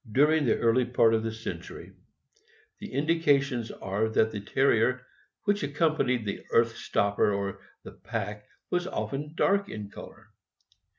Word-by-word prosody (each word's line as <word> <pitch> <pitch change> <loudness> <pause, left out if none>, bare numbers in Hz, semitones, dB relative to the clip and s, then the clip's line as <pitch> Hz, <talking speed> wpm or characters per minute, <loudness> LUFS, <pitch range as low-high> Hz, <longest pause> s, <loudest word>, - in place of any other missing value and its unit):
During 150 +5 +4
the 115 - +3
early 115 +2 +3
part 115 -2 +3
of 110 - +2
the 115 0 -3
century, 110 +1 -8 0.9
the 210 - -8
indications 140 -5 +1
are 100 +4 -2
that 110 0 +2
the 105 -2 -5
Terrier 125 +2 +2 0.4
which 205 0 +1
accompanied 145 -5 +1
the 100 - -4
earth 115 -1 +3
stopper 100 -1 +1
or 100 -1 -3 0.2
the - - -9
pack 105 +1 -5 0.2
was 180 0 0
often 150 -3 -4
dark 200 +3 +2
in 105 -2 -7
color. - - -12
125 Hz, 140 wpm, -28 LUFS, 110-150 Hz, 0.9 s, During